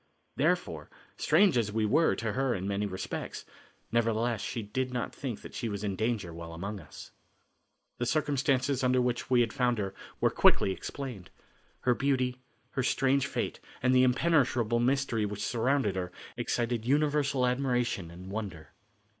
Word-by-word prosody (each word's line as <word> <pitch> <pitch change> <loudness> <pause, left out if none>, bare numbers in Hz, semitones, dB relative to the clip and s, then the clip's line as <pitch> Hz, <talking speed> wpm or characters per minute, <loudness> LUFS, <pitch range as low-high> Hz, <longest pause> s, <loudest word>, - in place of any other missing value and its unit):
Therefore, - - 0 0.3
strange 185 -12 +4
as 105 -2 -1
we 110 0 +1
were 160 +10 +3
to 115 -1 -2
her 135 -1 +1
in 95 0 -3
many 100 +1 0
respects, 95 -1 -5 0.5
nevertheless 115 -1 +1
she 115 - -3
did 130 +5 -2
not 125 -1 -3
think 125 -6 -5
that - - -10
she 115 - -3
was 100 -1 -4
in 100 -2 -1
danger 110 -5 -1
while 85 0 -8
among 100 +5 -5
us. 75 - -12 0.9
The 120 - 0
circumstances 140 -2 +1
under 125 0 +3
which 125 -1 -1
we 125 -1 +5
had 115 -2 0
found 125 -2 +1
her 100 -2 -2 0.3
were - - +3
quickly 95 - +4
explained. 120 -1 -6 0.5
Her 125 - +3
beauty, 130 -1 0 0.3
her 130 - -1
strange 135 +1 +2
fate - - -3 0.2
and 130 0 +4
the 130 - +6
impenetrable 125 -4 +3
mystery 125 -2 +1
which 105 0 -3
surrounded 120 -2 +1
her 90 -1 -3 0.2
excited 120 -1 -1
universal 140 0 +2
admiration 125 -8 0
and 90 +3 -10
wonder. 100 -7 -5
120 Hz, 160 wpm, -30 LUFS, 105-130 Hz, 0.9 s, the